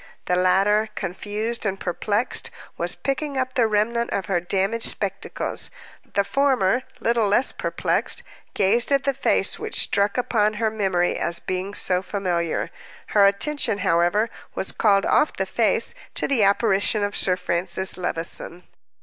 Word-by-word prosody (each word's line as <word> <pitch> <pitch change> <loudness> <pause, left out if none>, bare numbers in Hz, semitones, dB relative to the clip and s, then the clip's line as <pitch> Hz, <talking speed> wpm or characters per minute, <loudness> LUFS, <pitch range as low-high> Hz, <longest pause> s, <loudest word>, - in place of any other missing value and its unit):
The 180 - +1
latter, 195 +4 +3
confused 210 +5 -3
and 195 -2 -2
perplexed, 205 +6 -1 0.3
was - - -2
picking 275 +1 -3
up 255 0 -1
the 235 -3 +3
remnant 225 +3 0
of 195 - -2
her 175 0 0
damaged 195 +6 -1
spectacles; 195 -2 -3 0.5
the 200 - +3
former, 255 -3 +2 0.2
little 230 -2 +1
less 225 +7 +4
perplexed, - - 0 0.3
gazed 220 +7 +3
at 275 -1 +3
the 275 +1 +1
face - - +2
which - - 0
struck 200 +2 +1
upon 215 -4 +1
her 220 0 0
memory 190 -5 0
as 170 0 -1
being 185 +2 -4
so 180 0 +1
familiar. 180 -4 -2 0.4
Her 200 -2 +5
attention, 210 +3 0
however, 175 +6 +2 0.2
was 190 - -1
called 200 -2 +2
off 305 - +3
the - - -2
face - - 0 0.2
to - - 0
the 270 -5 +2
apparition 205 0 +2
of 205 0 -2
Sir 185 - +2
Francis 180 +2 0
Levison. 175 0 -2
205 Hz, 150 wpm, -23 LUFS, 185-230 Hz, 0.5 s, Her